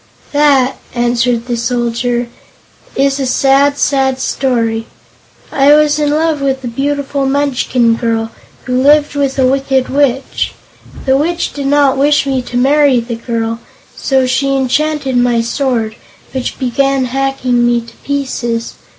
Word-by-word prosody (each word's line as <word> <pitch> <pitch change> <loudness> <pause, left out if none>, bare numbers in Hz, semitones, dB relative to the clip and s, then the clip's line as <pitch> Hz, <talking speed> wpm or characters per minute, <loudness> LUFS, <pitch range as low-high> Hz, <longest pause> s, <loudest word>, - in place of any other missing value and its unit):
"That," 280 -3 +3 0.2
answered 240 0 0
the 245 -1 -2
Soldier, 240 0 -1 0.7
"is 275 +1 +1
a 270 - -1
sad, 275 +2 +3
sad 265 -2 +1
story 230 -4 -1 0.6
I 280 +1 +4
was 300 0 +3
in 295 -1 +1
love 310 0 0
with 270 -1 -1
a - - -4
beautiful 280 +2 -2
Munchkin 260 -4 +1
girl, 225 -1 -1 0.3
who 255 0 -1
lived 295 +2 +4
with 280 -2 -1
a 265 - +3
Wicked 270 0 +1
Witch. 275 -1 0 0.5
The 265 -1 +3
Witch 340 +4 -1
did 280 -1 -4
not 280 -1 +3
wish 290 +1 +3
me 265 -2 0
to 245 0 -5
marry 275 0 +3
the 235 +1 -5
girl, 230 -1 -3 0.4
so 265 -1 +1
she 275 +2 0
enchanted 270 0 0
my 245 -1 +2
sword, 230 -2 -1 0.4
which 260 -2 -4
began 270 +1 0
hacking 255 -1 0
me 240 0 +2
to 230 - -15
pieces. 245 -5 -3
265 Hz, 140 wpm, -14 LUFS, 240-280 Hz, 0.7 s, I